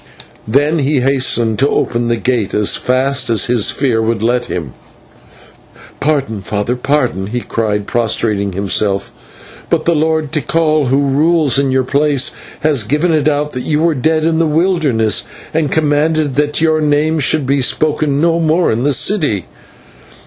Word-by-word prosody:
Then 145 +7 +1
he 140 -1 +1
hastened 125 -4 +1
to 140 +2 +3
open 120 0 -1
the 120 - +1
gate, 115 -4 -1
as 105 -1 +1
fast 130 +1 0
as 110 -5 +2
his 120 -4 +2
fear 125 -5 0
would 110 -1 -1
let 120 +1 +1
him. 80 - -5 1.3
"Pardon, 135 -8 -1
father, 105 +5 -2
pardon," 125 -7 -1
he 120 +4 -3
cried, 105 -3 -2
prostrating 105 -4 -1
himself, 100 +1 -1 0.6
"but 165 -2 0
the 170 - +3
Lord 160 -1 0
Tikal, 155 -2 0
who 135 +3 +2
rules 150 -1 +2
in 140 -1 +1
your 130 0 +1
place, 140 +1 +1 0.3
has 150 -5 +1
given 150 +9 0
it 155 -1 +2
out 150 0 -1
that 125 - -5
you 150 +3 -1
were 170 -1 +2
dead 155 +4 0
in 160 0 +1
the 165 - +2
wilderness, 155 - +1 0.3
and 155 -3 0
commanded 155 -1 +1
that 150 +2 0
your 160 -1 +2
name 150 +2 +1
should 150 0 +1
be 140 +1 +1
spoken 150 +1 0
no 165 +1 +2
more 165 +2 +1
in 115 +3 -1
the 145 +1 +2
city." 145 - +1
140 Hz, 165 wpm, -14 LUFS, 120-155 Hz, 1.3 s, to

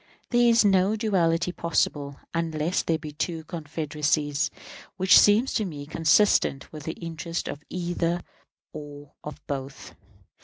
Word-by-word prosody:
There 240 -1 +4
is 230 -2 +5
no 195 +1 +3
duality 180 -6 +1
possible 145 -5 -1 0.2
(unless 165 0 -1
there 165 - 0
be 155 -1 -8
two 160 +2 -3
confederacies) 150 -2 -1 0.5
which 190 -1 +5
seems 215 +5 +5
to 220 - +1
me 150 -7 -6
consistent 160 -1 +2
with 150 -2 -8
the 160 - -3
interests 170 0 -5
of 145 - -6
either 175 -1 -1 0.5
or 145 -2 -10
of 150 - -9
both. 135 -1 -6
165 Hz, 130 wpm, -26 LUFS, 150-180 Hz, 0.5 s, is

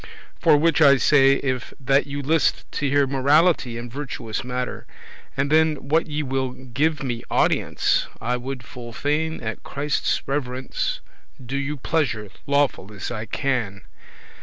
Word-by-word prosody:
For 150 - +5
which 160 +2 +2
I 140 -2 +7
say, 135 0 +5
if 130 -3 -2
that 135 +1 +2
you 140 0 -4
list 160 +3 +2
to 140 - -1
hear 140 0 +4
Morality 140 -1 +3
and 120 0 -7
virtuous 125 -6 -4
mattere, 125 0 -4 0.5
And 140 +2 0
then 155 -3 +2
that 160 +2 +2
ye 150 0 -2
will 130 -1 -2
give 135 +5 -1
me 120 -3 -3
audience, - - +2
I 120 +2 -1
would 125 0 -5
full 120 -1 -9
fain 155 +5 -1
at 110 0 -4
Christe's 145 +1 -1
reverence 130 -2 -2 0.4
Do 130 +1 -6
you 140 +2 -2
pleasance 125 -9 -1
lawful, 140 -8 +1
as 100 +1 -6
I 110 -1 -4
can. 115 -7 -2
135 Hz, 150 wpm, -23 LUFS, 125-145 Hz, 0.5 s, I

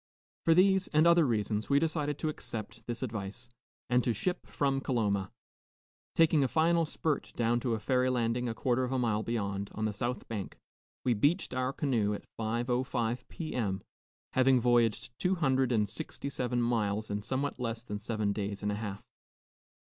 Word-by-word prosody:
For 165 - +6
these 190 +1 +4
and 155 +1 +3
other 170 -3 +6
reasons, 110 -2 -1
we 140 - +5
decided 150 -2 0
to 155 - -1
accept 110 -7 -6
this 120 +1 -3
advice, 110 0 -5 0.4
and 125 0 +3
to 120 - +1
ship 180 - -2
from 135 -1 0
Coloma. 105 -8 0 0.8
Taking 160 -3 +5
a - - +3
final 165 +2 +3
spurt 155 -2 -1
down 120 0 +2
to 120 -2 0
a - - -4
ferry 130 +3 +2
landing 120 0 0
a 115 - -3
quarter 125 +1 +1
of 125 - -2
a 130 - +1
mile 115 -4 +1
beyond, 100 -4 -2
on 110 - -1
the 110 - -1
south 120 +4 -3
bank, 105 -4 -5 0.5
we 125 - +4
beached 145 - +1
our 130 0 0
canoe 115 -8 0
at - - -9
5.05 120 +1 -1
P.M., 115 - -3 0.5
having 130 0 +5
voyaged 120 -2 +2
two 185 +1 +2
hundred 135 -6 +2
and 105 -3 +2
sixty 125 +6 -5
seven 125 -2 -1
miles 110 -3 0
in 100 0 -1
somewhat 135 +5 -2
less 115 -1 -3
than 105 -3 -5
seven 105 -2 -1
days 100 -1 -4
and 105 - +1
a - - -1
half. 100 -3 -5
120 Hz, 180 wpm, -31 LUFS, 110-135 Hz, 0.8 s, For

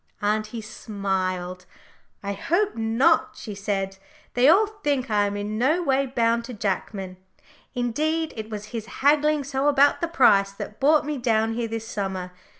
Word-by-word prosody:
Auntie 215 +2 -1
smiled. 190 -4 -3 0.6
"I 200 0 -2
hope 350 - 0
not," 230 +9 +2
she 215 - -7
said. 195 -1 -3 0.3
"They 250 +3 +5
all 395 +7 +6
think 290 - -2
I 205 -1 +3
am 200 0 -3
in 210 +1 -3
no 310 +8 +2
way 275 -2 +1
bound 235 -2 +1
to 250 - -8
Jackman. 195 -2 -3 0.6
Indeed, 305 +7 -1
it 220 -1 -6
was 210 -1 -6
his 225 -1 -4 0.2
haggling 300 +1 +4
so 275 +1 -1
about 285 0 +4
the 340 - +1
price 200 -11 +4
that 210 +1 -8
brought 300 +2 +4
me 300 -2 -3
down 225 -2 +1
here 235 0 -2
this 225 0 -5
summer. 190 -5 -4
225 Hz, 160 wpm, -24 LUFS, 205-280 Hz, 0.6 s, all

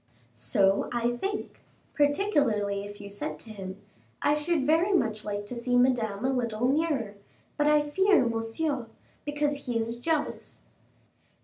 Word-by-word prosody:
"So 195 - +2
I 240 0 0
think, 400 +8 -4 0.3
particularly 285 - +1
if 205 0 -9
you 200 0 -9
said 155 -6 -4
to 225 - -11
him: 195 -2 -7 0.4
'I 290 - +4
should 300 -1 0
very 325 +7 +3
much 220 - +1
like 205 0 -3
to 245 - -5
see 245 +1 +1
Madame 240 -4 +2
a 265 - +2
little 235 -2 0
nearer, 275 -7 0 0.4
but 295 - +2
I 300 0 +4
fear 380 0 +4
Monsieur, 235 +3 -1 0.4
because 290 -1 -1
he 240 -2 0
is 230 +1 -2
jealous. 300 +4 -2
245 Hz, 145 wpm, -28 LUFS, 215-295 Hz, 0.4 s, I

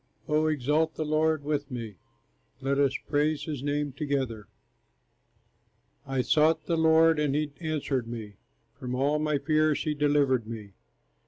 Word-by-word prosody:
O 155 +1 +2
exalt 155 +2 +1
the 155 - -2
Lord 155 0 +1
with 145 -1 -2
me, 115 -4 -6 0.7
Let 140 +1 0
us 140 -2 +2
praise 150 +1 +1
his 150 -5 -4
name 145 0 -1
together. 135 -7 -3 1.6
I 135 -1 0
sought 155 +3 +3
the 170 - 0
Lord 160 0 +4
and 145 -2 +1
he 150 -1 -1
answered 145 -6 -2
me, 110 -3 -7 0.5
From 125 0 -4
all 145 +4 +1
my 150 -1 +1
fears 155 +1 +1
he 155 - 0
delivered 145 -5 +2
me. 110 -3 -7
145 Hz, 145 wpm, -28 LUFS, 135-155 Hz, 1.6 s, Lord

